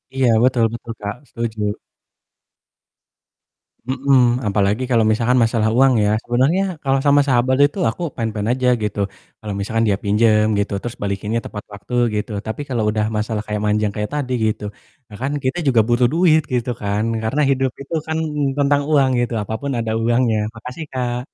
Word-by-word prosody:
Iya, 130 -2 +3
betul 125 -2 +3
betul 115 0 -7
Kak, 100 0 -4
setuju. 115 -2 -4 2.3
Mhm, 130 -2 +2
apalagi 100 +3 +1
kalau 115 -2 +4
misalkan 120 +3 +2
masalah 115 -1 +1
uang 135 0 +5
ya, 105 - +2
sebenarnya 130 +10 +2 0.2
kalau 135 -1 +2
sama 145 0 +5
sahabat 130 0 +2
itu 145 0 +1
ya - - +3
aku 175 - -6
fine-fine 110 -2 -2
aja 130 0 0 0.2
gitu, 105 -1 -3 0.4
kalau 105 -2 -5
misalkan 115 +3 0
dia 100 -2 +2
pinjem 105 +1 +3 0.2
gitu, 100 0 -1
terus 120 0 -5
balikinnya 100 +3 -2
tepat 105 - -7
waktu, 100 +4 -10 0.2
gitu. 105 +1 -3 0.2
Tapi 110 +6 -4
kalau 120 -4 0
udah 105 0 0
masalah 105 0 -2
kayak 105 -1 -2
manjang 105 0 +1
kayak 105 0 -3
tadi 130 -3 -2
gitu, 110 -1 -2 0.4
nah 105 - -11
kan 135 +2 -1
kita 130 +6 0
juga 120 -4 +5
butuh 120 +1 +3
duit, 165 -2 +4
gitu 125 0 0
kan. 100 +1 -1 0.2
Karena 130 +7 0
hidup 135 -1 +1
itu 140 - -9
kan 160 0 -1 0.4
tentang 145 0 +3
uang 140 -3 +4
gitu, 120 0 -1
apapun 110 +7 -4
ada 115 -1 -2
uangnya. 120 -1 +2 0.2
Makasih 125 +7 -7
Kak. 125 -2 -2
120 Hz, 170 wpm, -20 LUFS, 105-130 Hz, 2.3 s, uang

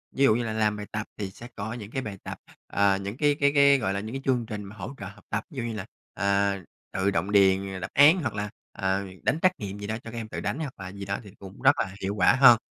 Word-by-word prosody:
Ví 140 - +2
dụ 110 -5 +6
như 120 - 0
là 115 -1 -3
làm 105 -1 +1
bài 105 0 -6
tập 110 0 -3
thì 100 -2 -4
sẽ 120 +5 -11
có 110 +2 -4
những 110 -3 -8
cái 130 - -2
bài 105 -6 -6
tập, - - -6 0.3
ờ, 100 -1 +3
những 100 +4 -5
cái 145 0 +3
cái 140 0 +4
cái, 140 0 +7
gọi 95 -5 0
là, 100 - -1
những 110 +3 -6
cái 135 - -4
chương 125 -3 +2
trình 105 -1 -5
mà 100 +2 -10
hỗ 105 +6 -6
trợ 100 - -7
học 105 +2 -13
tập. 105 +2 -1
Ví 145 - -13
dụ 125 - -1
như 115 -1 -3
là, 105 -3 -5 0.3
ờ, 100 0 +1 0.4
tự 95 +1 +1
động 95 +3 -1
đền 95 -1 +3
đáp - - -4
án 150 +6 +7
hoặc 120 -6 -2
là, 105 0 -3 0.2
ờ, 95 0 -1 0.2
đánh 155 - +1
trắc 185 - +5
nghiệm 100 -1 -5
gì 100 - -5
đó, 110 0 -2
cho 115 - -8
các 120 - -7
em 115 -1 -4
tự - - -5
đánh 150 - -2
hoặc 145 -5 -4
là 95 -1 -6
gì 100 0 -7
đó 100 0 -2
thì 100 - -12
cũng 95 -1 -11
rất - - +5
là 95 - -1
hiệu 100 +2 -2
quả - - +5
hơn 130 -3 +8
105 Hz, 300 wpm, -27 LUFS, 100-120 Hz, 0.4 s, hơn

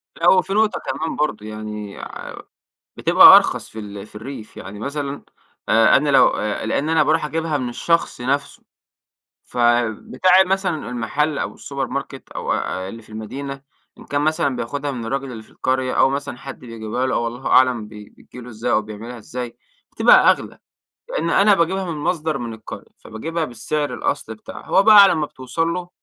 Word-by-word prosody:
لا - - -3
هو 475 -1 +6
في - - -5
نقطة 215 +1 +2
كمان 160 - -3
برضو 110 -9 -2
يعني 105 -1 -7
ع - - -8 0.7
بتبقى - - +9
أرخص - - +2
في 110 - -9
ال 100 -1 -8
في - - -21
الريف، 110 0 -9
يعني 100 +2 -9
مثلًا 140 +3 -4 0.5
آآ 115 0 +5
أنا 145 +1 0
لو 135 -3 +6
آآ، 105 0 -3
لأن 150 +3 -1
أنا 160 -1 +4
باروح 155 +1 +1
أجيبها 160 0 -2
من 125 -3 -3
الشخص 165 +2 0
نفسه، 140 +3 -2 0.8
فبتاع 120 - +2
مثلًا 190 -5 -2
المحل 140 +5 -1
أو - - -3
السوبر 140 -1 -5
ماركت 135 0 -6
أو - - -2
أ 95 0 -3
اللي 115 +3 -9
في 110 - -20
المدينة 135 +6 -7 0.4
إن - - -14
كان 145 0 -1
مثلًا 150 -3 +1
بياخدها 140 +5 -3
من 120 -4 -6
الراجل 135 +2 -3
اللي 110 -2 -8
في - - -22
القرية 130 0 -1
أو - - +4
مثلًا 140 -2 -4
حد 135 +1 -9
بيجيبها 115 +1 -4
له 130 - -1
أو 120 - 0
الله 120 +3 -6
أعلم 125 -4 +3
بي 105 -1 -12
بتيجي - - -15
له 125 - -10
إزاي 115 +1 -3
أو 110 - +3
بيعملها 110 +3 -9
إزاي، 120 +2 -7 0.3
بتبقى - - +6
أغلى. - - -5 0.5
لأن - - -2
أنا 205 +1 +5
باجيبها 190 +2 0
من 155 - -5
مصدر 155 -1 -1
من 120 -3 -5
القرية، 110 -1 -10
فباجيبها 160 +9 -4
بالسعر 140 +3 -3
الأصلي 110 - -3
بتاعها. 110 - -11
هو 195 - +3
بقى 210 -1 +9
على 195 - +4
ما 155 -2 -1
بتوصَل 145 +4 -3
له 175 0 -5
130 Hz, 185 wpm, -21 LUFS, 115-155 Hz, 0.8 s, بتبقى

